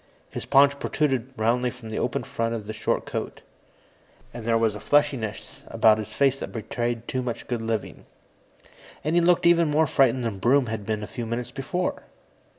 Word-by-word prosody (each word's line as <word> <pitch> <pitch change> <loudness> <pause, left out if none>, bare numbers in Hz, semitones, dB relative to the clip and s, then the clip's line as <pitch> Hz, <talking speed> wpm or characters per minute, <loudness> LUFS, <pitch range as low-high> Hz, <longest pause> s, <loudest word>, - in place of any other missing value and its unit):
His - - -6
paunch 140 0 +5
protruded 135 -4 -1
roundly 120 +3 +1
from 120 -3 -10
the - - -2
open - - -1
front 115 0 -2
of 110 -2 -6
the 110 - -5
short 110 - -1
coat, - - -5 0.9
and 115 -1 -7
there 115 -1 +3
was 115 -2 +2
a 105 - -7
fleshiness 130 -7 0
about 110 -1 +4
his 110 0 -6
face 135 +2 +2
that - - -6
betrayed 120 +1 -3
too 130 - -2
much 120 -2 -4
good 120 -2 -3
living. 115 -2 -4 1.0
And 155 - -1
he 175 - +4
looked 175 0 +3
even 170 -2 +5
more 155 +2 +3
frightened 130 -3 +2
than 105 -4 -3
Broom 130 +6 +3
had 110 -3 -5
been 105 -1 -2
a - - -3
few 120 -3 -6
minutes 115 +1 -3
before. 165 +7 -3
120 Hz, 190 wpm, -25 LUFS, 110-140 Hz, 1.0 s, paunch